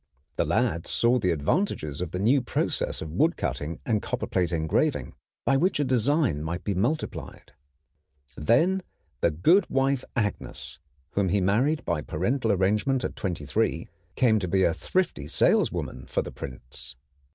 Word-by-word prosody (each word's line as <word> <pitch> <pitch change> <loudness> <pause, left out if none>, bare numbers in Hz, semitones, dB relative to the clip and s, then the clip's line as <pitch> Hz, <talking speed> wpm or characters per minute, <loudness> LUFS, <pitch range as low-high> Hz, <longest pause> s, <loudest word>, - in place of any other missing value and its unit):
The - - +1
lad 85 +2 0
saw 120 +2 +3
the 90 - +1
advantages 75 - 0
of 90 - -2
the 90 - -4
new 120 +8 +3
process 120 - -1
of 80 - -7
woodcutting 85 - 0
and 110 -3 +1
copperplate 90 -2 -1
engraving, 80 -6 0 0.3
by 135 - +4
which 180 +2 +1
a - - +3
design 130 - +2
might 85 +3 -4
be 100 - -1
multiplied. 120 - -3 0.8
Then 165 - +3 0.4
the - - +3
good 165 - +3
wife 135 0 +1
Agnes, 105 -3 -3 0.3
whom 100 -2 +1
he 100 - +2
married 120 +12 +1
by 75 - 0
parental 110 - 0
arrangement 105 +7 +1
at - - -3
twenty 85 -6 -3
three, 85 -1 0 0.3
came 115 -4 +4
to 95 - -3
be 95 +2 +2
a 85 - +3
thrifty 180 - -1
saleswoman 65 -3 +1
for - - -1
the - - -7
prints. 65 -1 -6
100 Hz, 150 wpm, -26 LUFS, 85-135 Hz, 0.8 s, by